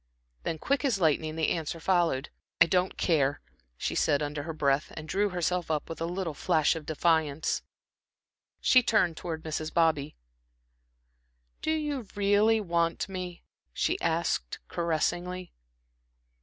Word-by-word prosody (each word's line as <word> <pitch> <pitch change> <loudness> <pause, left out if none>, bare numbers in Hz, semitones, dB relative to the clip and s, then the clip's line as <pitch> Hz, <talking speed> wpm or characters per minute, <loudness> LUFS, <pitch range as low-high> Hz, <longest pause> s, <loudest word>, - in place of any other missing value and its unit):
Then, 160 - -3
quick 270 - 0
as 250 -8 +1
lightning, 155 -1 +1
the 160 -1 +1
answer 165 0 -2
followed. 165 -6 +1 0.3
"I 170 - +9
don't 180 +2 +1
care," 145 -5 +2 0.4
she - - -2
said, 145 +1 +2
under 145 0 -3
her 160 +3 -5
breath, 140 -1 +1
and 155 0 -6
drew 205 +4 +1
herself 180 -1 -1
up 155 -2 -1
with 165 - -6
a 165 - 0
little 175 -2 -3
flash 155 +2 +2
of 160 -2 -7
defiance. 160 -2 +1 1.0
She 255 - +6
turned 210 -8 +2
towards 160 -1 -5
Mrs. 155 0 -3
Bobby. 160 -3 +2 1.5
"Do - - -2
you 295 -7 -1
really 205 +2 +4
want 170 -1 0
me?" 180 -2 -6 0.3
she - - 0
asked, - - 0
caressingly. 175 +2 -1
170 Hz, 140 wpm, -29 LUFS, 155-185 Hz, 1.5 s, I